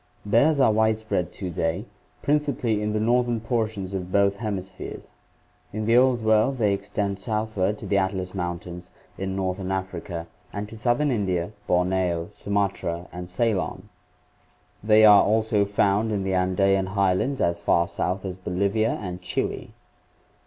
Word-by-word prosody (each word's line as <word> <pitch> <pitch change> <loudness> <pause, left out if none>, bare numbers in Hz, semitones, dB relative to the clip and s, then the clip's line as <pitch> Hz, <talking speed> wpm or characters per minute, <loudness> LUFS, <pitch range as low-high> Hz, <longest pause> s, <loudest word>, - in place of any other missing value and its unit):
Bears 140 +9 +3
are 130 -5 +5
widespread 110 -4 0
to 95 -3 -5
day, 85 +5 -1 0.4
principally 140 -7 +1
in 105 0 -1
the 110 - 0
northern 120 +1 +2
portions 110 -4 -2
ol 95 - -1
both 100 +2 +1
hem 105 -3 -2
ispheres. 95 0 -8 0.6
In 110 +1 -3
the 115 +2 +3
Old 125 -2 +4
World 110 +5 +3
they 105 -4 +2
extend 100 0 -3
southward 105 -2 -1
to - - -9
the 100 - +2
Atlas 95 -1 -2
Moun 90 -2 -2
tains 90 0 -10 0.3
in 95 0 -3
northern 95 0 -2
Africa 90 -3 -4 0.3
and 100 +1 -4
to 115 - -10
southern 120 +6 +1
India, 95 -5 -1 0.2
Borneo, 90 -1 +1
Sumatra 100 -4 -2
and 90 0 -7
Ceylon. 105 0 -1 0.9
They 110 0 +6
are 105 -1 +8
also 110 -1 +2
found 100 +2 +1
in 100 -2 -1
the 95 0 -1
Andean 95 +1 +2
highlands 100 +8 +1
as 85 0 0
far 85 0 +2
south 95 +3 -2
as 95 -1 -5
Bolivia 100 +5 0
and 90 -1 -5
Chile. - - -3
100 Hz, 150 wpm, -25 LUFS, 95-110 Hz, 0.9 s, are